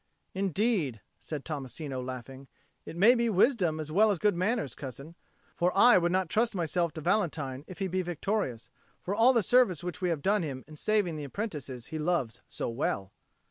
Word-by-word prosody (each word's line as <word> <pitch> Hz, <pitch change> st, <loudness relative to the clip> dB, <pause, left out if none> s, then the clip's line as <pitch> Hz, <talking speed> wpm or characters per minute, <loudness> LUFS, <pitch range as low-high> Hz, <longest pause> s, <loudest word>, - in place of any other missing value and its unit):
"Indeed," 195 Hz, -, 0 dB, 0.2 s
said 150 Hz, -3 st, -6 dB
Tommasino, 140 Hz, -2 st, -5 dB
laughing, 130 Hz, +1 st, -8 dB, 0.4 s
"it -, -, -7 dB
may 215 Hz, +7 st, +7 dB
be 235 Hz, -1 st, +1 dB
wisdom 190 Hz, -, +2 dB
as 155 Hz, -1 st, -5 dB
well 215 Hz, +6 st, +5 dB
as 200 Hz, -, +1 dB
good 205 Hz, +2 st, +2 dB
manners, 185 Hz, -, 0 dB
cousin. 140 Hz, +4 st, -8 dB, 0.4 s
For 180 Hz, +1 st, +2 dB
I 235 Hz, -1 st, +7 dB
would 175 Hz, 0 st, +1 dB
not 185 Hz, 0 st, +1 dB
trust 225 Hz, +5 st, +1 dB
myself 170 Hz, -1 st, 0 dB
to 160 Hz, -, -6 dB
Valentine 155 Hz, -8 st, -1 dB
if 185 Hz, -, -9 dB
he 195 Hz, -, -1 dB
be 185 Hz, +1 st, -1 dB
victorious, 175 Hz, -, -3 dB, 0.3 s
for 190 Hz, -, -2 dB
all 230 Hz, +5 st, +5 dB
the 235 Hz, -4 st, +2 dB
service 205 Hz, -, +3 dB
which 180 Hz, +1 st, -5 dB
we 180 Hz, -, +1 dB
have 160 Hz, -4 st, -2 dB
done 205 Hz, +1 st, +2 dB
him 135 Hz, -5 st, -5 dB
in 155 Hz, -, -12 dB
saving 190 Hz, -1 st, 0 dB
the 150 Hz, -, -5 dB
apprentices 140 Hz, -, -5 dB
he 155 Hz, -, -2 dB
loves 150 Hz, -8 st, -1 dB
so -, -, -4 dB
well." 110 Hz, -5 st, -2 dB
175 Hz, 190 wpm, -29 LUFS, 140-205 Hz, 0.4 s, may